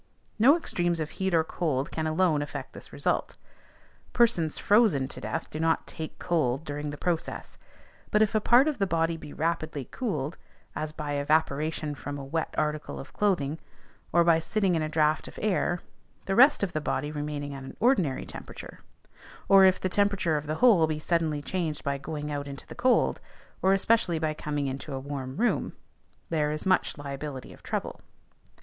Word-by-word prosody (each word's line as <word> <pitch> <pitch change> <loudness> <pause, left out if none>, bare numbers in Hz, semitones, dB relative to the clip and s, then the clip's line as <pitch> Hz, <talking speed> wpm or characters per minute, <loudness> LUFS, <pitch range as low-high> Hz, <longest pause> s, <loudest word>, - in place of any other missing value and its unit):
No 275 +9 +7
extremes 175 - -1
of 155 -1 -3
heat 190 0 -2
or 160 - +4
cold 150 -4 -2
can 160 -1 -2
alone 155 -2 +2
affect 145 - -6
this - - -11
result: - - -1 0.8
persons 200 -10 +2
frozen 205 - +3
to - - -8
death - - -4
do 155 - -5
not 160 0 +1
"take 160 -1 -7
cold" 155 -5 0
during 150 0 -4
the 145 - -6
process. 170 0 -3 0.5
But 210 +1 +4
if 215 - 0
a 215 - +2
part 245 +6 +5
of 300 -6 -1
the 195 - +2
body 165 -1 +1
be 155 -2 -10
rapidly 155 -4 -2
cooled, 165 - -3 0.4
as 155 0 -3
by 150 -1 -5
evaporation 155 +1 0
from 145 0 -6
a 140 - -7
wet 160 +4 -2
article 150 0 -2
of 135 - -10
clothing, 165 -7 0 0.5
or 170 - +5
by 165 -1 +4
sitting 195 +2 0
in 165 - +1
a 155 - -1
draught 155 0 +1
of - - -11
air, 185 -4 0 0.4
the 195 - -1
rest 265 +3 +6
of 185 - -1
the 155 - -1
body 145 0 -2
remaining 145 -1 -4
at 135 - -7
an 130 - -10
ordinary 190 - +2
temperature; - - -10 0.7
or 195 -1 +8
if 185 0 +4
the - - -1
temperature 200 -4 +1
of 150 0 -3
the 155 - -1
whole 195 -7 +5
be 155 -1 -2
suddenly 155 -2 0
changed 165 -3 -2
by 140 -1 -1
going 150 +1 -5
out 145 -1 -3
into 140 -1 -8
the - - -10
cold, 255 0 +2 0.4
or 190 - +4
especially 195 -3 +3
by 155 -1 -1
coming 150 -1 -3
into 135 +2 -4
a - - -3
warm 135 -1 -6
room, 240 +3 +1 0.6
there 150 -2 +1
is 155 +4 -4
much 185 -4 +2
liability 140 -2 -6
of - - -17
trouble. - - -4
155 Hz, 185 wpm, -28 LUFS, 145-185 Hz, 0.8 s, or